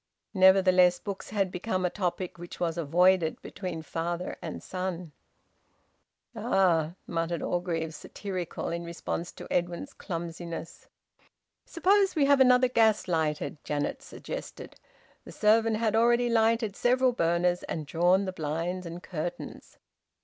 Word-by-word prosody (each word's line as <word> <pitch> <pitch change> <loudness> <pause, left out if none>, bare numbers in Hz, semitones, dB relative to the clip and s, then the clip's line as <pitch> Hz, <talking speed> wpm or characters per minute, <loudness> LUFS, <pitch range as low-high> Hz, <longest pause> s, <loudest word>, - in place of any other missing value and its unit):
Nevertheless 185 -2 +5
books 200 0 -7
had 195 -3 0
become 185 0 -2
a 180 - 0
topic 180 -2 -3
which 175 0 -9
was 165 -2 -1
avoided 170 +1 +2
between 180 -4 -6
father 170 +3 -3
and - - -6
son. 180 -3 -4 1.2
"Ah!" 170 -4 +2
muttered 165 -1 -2
Mr - - -2
Orgreave, 165 -3 -2
satirical, 185 +2 -5
in 170 0 -3
response 170 0 -4
to - - -10
Edwin's 175 +11 -2
clumsiness. 170 -1 -6 0.8
"Suppose 390 +3 +2
we 295 -3 +3
have 280 0 +5
another 255 -1 +6
gas 220 -5 +3
lighted," 155 -4 -1
Janet 145 -1 -2
suggested. - - -8 0.5
The - - -11
servant 220 +1 +3
had 220 -1 0
already 240 +1 +3
lighted 225 -2 +2
several 255 +3 +3
burners 175 -3 +1
and 155 -2 -5
drawn 175 +6 +2
the 185 - -4
blinds 170 +3 -3
and 170 +1 -8
curtains. 170 0 -6
180 Hz, 130 wpm, -28 LUFS, 170-215 Hz, 1.2 s, another